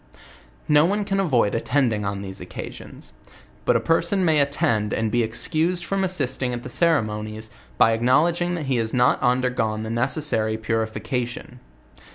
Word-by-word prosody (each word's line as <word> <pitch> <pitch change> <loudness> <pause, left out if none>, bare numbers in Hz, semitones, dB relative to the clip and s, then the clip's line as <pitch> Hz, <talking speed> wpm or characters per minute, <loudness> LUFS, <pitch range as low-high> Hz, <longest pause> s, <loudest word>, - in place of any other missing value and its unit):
No 150 0 +5
one 205 +4 0
can 195 -1 -1
avoid 125 - +2
attending 115 -3 0
on 100 0 -3
these 95 -1 -7
occasions; 90 - -9 0.5
but - - +3
a - - +4
per 165 0 +2
son 185 +2 0
may 160 -3 +3
attend 115 -7 +1
and 110 -1 -1
be 120 - +2
excused 160 +10 -1
from 195 +1 -1
.assisting 135 -8 -2
at 120 - -7
the - - -7
ceremo 120 -9 +1
nies, 110 +1 -7 0.3
by 115 - +5
acknowledging 165 +10 +2
that 160 -4 -4
he 135 -2 0
has 115 0 -1
not 125 0 +3
undergone 125 -4 0
the 110 - -5
neces 130 +6 0
sary 110 -6 0
purification. 115 +3 -3
125 Hz, 170 wpm, -23 LUFS, 110-160 Hz, 0.5 s, No